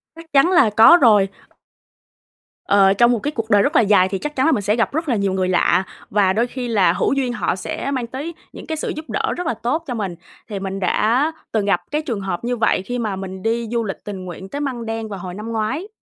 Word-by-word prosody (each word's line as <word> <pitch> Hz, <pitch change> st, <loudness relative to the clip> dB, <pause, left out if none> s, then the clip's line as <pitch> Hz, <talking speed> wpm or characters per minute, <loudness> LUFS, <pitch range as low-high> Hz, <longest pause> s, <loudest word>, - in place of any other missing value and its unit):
Chắc 330 Hz, -, -11 dB
chắn 280 Hz, +6 st, +5 dB
là 335 Hz, -12 st, +5 dB
có 225 Hz, +11 st, +7 dB
rồi. 210 Hz, -6 st, +5 dB, 1.4 s
Ờ, 195 Hz, -1 st, +4 dB
trong 240 Hz, +4 st, +4 dB
một 235 Hz, -, +1 dB
cái 295 Hz, -, -3 dB
cuộc 225 Hz, -6 st, -4 dB
đời 205 Hz, -2 st, +5 dB
rất 285 Hz, +9 st, 0 dB
là -, -, +6 dB
dài 200 Hz, -4 st, +4 dB
thì 195 Hz, -, -2 dB
chắc 295 Hz, 0 st, -5 dB
chắn 260 Hz, -, +1 dB
là 325 Hz, -, +4 dB
mình 235 Hz, -, +1 dB
sẽ 210 Hz, +2 st, +1 dB
gặp 230 Hz, +3 st, 0 dB
rất 320 Hz, 0 st, -2 dB
là 245 Hz, -, +2 dB
nhiều 200 Hz, -2 st, 0 dB
người 185 Hz, -1 st, 0 dB
lạ, 185 Hz, +1 st, +3 dB, 0.3 s
và 195 Hz, -2 st, +2 dB
đôi 230 Hz, +4 st, +1 dB
khi 250 Hz, 0 st, -5 dB
là 195 Hz, -7 st, +3 dB
hữu -, -, 0 dB
duyên 260 Hz, -3 st, -1 dB
họ 240 Hz, -, -1 dB
sẽ 270 Hz, +8 st, -4 dB
mang 255 Hz, -4 st, -2 dB
tới 280 Hz, +8 st, -6 dB, 0.2 s
những -, -, -10 dB
cái 315 Hz, -, -3 dB
sự -, -, -3 dB
giúp 310 Hz, +1 st, -8 dB
đỡ -, -, -1 dB
rất 355 Hz, -2 st, -3 dB
là -, -, +1 dB
tốt 295 Hz, +8 st, -2 dB
cho 250 Hz, -, -3 dB
mình, 195 Hz, -6 st, -3 dB, 0.3 s
thì 205 Hz, -2 st, -4 dB
mình 195 Hz, 0 st, -4 dB
đã 235 Hz, -, +1 dB, 0.2 s
từng 215 Hz, -3 st, 0 dB
gặp 195 Hz, -3 st, +1 dB
cái 300 Hz, +1 st, 0 dB
trường 235 Hz, -9 st, -4 dB
hợp 190 Hz, -1 st, -4 dB
như 245 Hz, +1 st, -1 dB
vậy 220 Hz, -4 st, +2 dB
khi 245 Hz, +6 st, -4 dB
mà 215 Hz, -4 st, -2 dB
mình 190 Hz, 0 st, -7 dB
đi 230 Hz, +1 st, -1 dB
du 235 Hz, -1 st, 0 dB
lịch 200 Hz, -3 st, -6 dB
tình 195 Hz, -3 st, -6 dB
nguyện 185 Hz, +2 st, -8 dB
tới 285 Hz, -, -5 dB
Măng 255 Hz, -5 st, -3 dB
Đen 225 Hz, 0 st, -4 dB
vào 200 Hz, -3 st, -6 dB
hồi 180 Hz, 0 st, -7 dB
năm 215 Hz, +4 st, -6 dB
ngoái. 225 Hz, -, -2 dB
225 Hz, 265 wpm, -20 LUFS, 195-265 Hz, 1.4 s, có